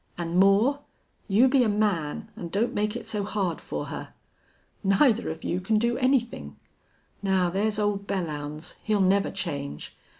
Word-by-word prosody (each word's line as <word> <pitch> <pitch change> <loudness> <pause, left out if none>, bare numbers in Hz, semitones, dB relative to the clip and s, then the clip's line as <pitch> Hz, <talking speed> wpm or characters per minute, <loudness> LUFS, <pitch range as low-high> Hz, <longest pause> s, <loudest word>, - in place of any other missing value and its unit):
"An' 170 0 -2
Moore, 200 +9 +4 0.5
you 215 +6 +5
be 265 0 +4
a 225 - +2
man 205 -8 -1
an' 170 - -6
don't 205 +7 0
make 210 +1 -1
it 240 - -5
so 210 -2 -2
hard 195 -4 -2
for - - -4
her. - - -8 0.7
Neither 215 +4 +3
of 160 0 -6
you 180 - -1
can 215 +4 +1
do 235 +2 +1
anythin'.... 245 - 0 0.7
Now 190 -3 +2
there's 210 +3 0
old 205 -1 -1
Belllounds 155 -3 -4
he'll 215 -2 +1
never 195 +1 +3
change. 140 -4 -5
200 Hz, 160 wpm, -26 LUFS, 175-215 Hz, 0.7 s, you